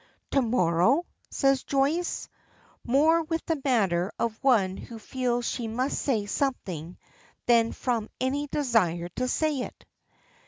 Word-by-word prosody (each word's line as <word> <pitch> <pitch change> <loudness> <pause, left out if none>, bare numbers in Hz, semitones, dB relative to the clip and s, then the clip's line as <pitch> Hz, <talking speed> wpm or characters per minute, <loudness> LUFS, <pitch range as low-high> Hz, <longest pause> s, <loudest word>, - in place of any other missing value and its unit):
"To 275 - +3
morrow?" 230 - +2 0.2
says 275 -1 +2
Joyce, 290 +6 0 0.6
more 310 +7 +4
with 325 +1 -3
the 320 -4 -1
manner 195 -8 +2
of 230 +2 -2
one 210 -9 +3
who 230 +3 -9
feels 245 +1 -2
she 235 -3 -2
must 250 +5 -1
say 225 -7 0
something 185 - -3 0.5
than 230 -1 +4
from 230 -4 -2
any 275 +3 -1
desire 210 - +1
to 255 - 0
say 305 +1 0
it. 250 - -7
250 Hz, 130 wpm, -27 LUFS, 215-275 Hz, 0.6 s, more